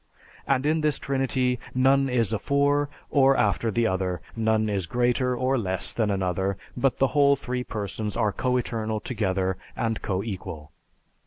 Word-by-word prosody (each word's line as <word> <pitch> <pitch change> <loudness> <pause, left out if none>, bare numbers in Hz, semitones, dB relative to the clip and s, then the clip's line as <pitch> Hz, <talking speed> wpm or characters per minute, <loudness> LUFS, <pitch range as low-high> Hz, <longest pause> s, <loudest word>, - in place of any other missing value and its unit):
And 135 0 +1
in 155 +1 +2
this 150 -2 +1
Trinity, 130 -2 0 0.2
none 135 +1 +4
is 115 -3 +1
afore 140 +5 +1 0.2
or 135 -1 +5
after 105 +2 +1
the 115 +2 +1
other; 95 -3 -1 0.2
none 110 -1 +1
is 100 -4 -1
greater 125 +3 +1
or 130 +1 +1
less 95 -4 -1
than 110 -3 0
another; 95 0 -1 0.2
but 130 +1 +1
the 135 - +3
whole 140 -1 +4
three 125 -2 -3
Persons 105 -1 -4
are 110 -3 +2
coeternal 115 -3 -1
together 95 -5 -1 0.2
and 115 -1 -1
coequal." 95 -6 -4
115 Hz, 150 wpm, -26 LUFS, 100-130 Hz, 0.2 s, or